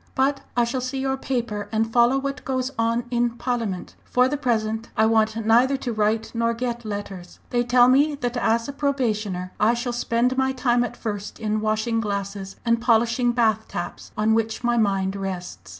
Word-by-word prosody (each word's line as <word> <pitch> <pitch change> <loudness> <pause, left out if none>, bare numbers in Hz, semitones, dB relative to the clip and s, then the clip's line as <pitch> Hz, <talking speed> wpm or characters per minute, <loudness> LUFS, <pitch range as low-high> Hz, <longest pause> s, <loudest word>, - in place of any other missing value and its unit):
But 275 +1 +1 0.2
I 240 - +5
shall 240 +2 -1
see 255 +2 -3
your 265 0 0
paper 235 -6 -3
and 225 0 0
follow 240 +2 +4
what 275 +1 -3
goes 260 0 -2
on 230 +1 +1
in 240 -1 0
Parliament. 230 -8 -3
For 250 0 +2
the 285 - -1
present 225 -4 -1
I 220 - +5
want 220 0 +2
neither 245 +5 +4
to 245 -3 -4
write 215 +1 0
nor 230 0 0
get 240 0 -3
letters. 200 -4 -6
They 240 0 +2
tell 245 0 +5
me 285 +4 +4
that 245 -3 -3
as 230 -1 +1
a 280 - -5
probationer 215 -10 -1
I 225 +3 +4
shall 240 +1 -3
spend 240 +1 +1
my 265 0 +1
time 245 -2 +2
at 245 - -5
first 205 -2 -5
in 215 -1 -1
washing 220 +1 0
glasses, 200 -2 -4
and 230 0 +2
polishing 235 +1 +3
bath 220 -2 +1
taps, 175 - -6
on 215 +1 +3
which 225 +1 -1
my 240 0 +2
mind 195 -3 +1
rests! 180 - -6
230 Hz, 190 wpm, -23 LUFS, 215-250 Hz, 0.2 s, I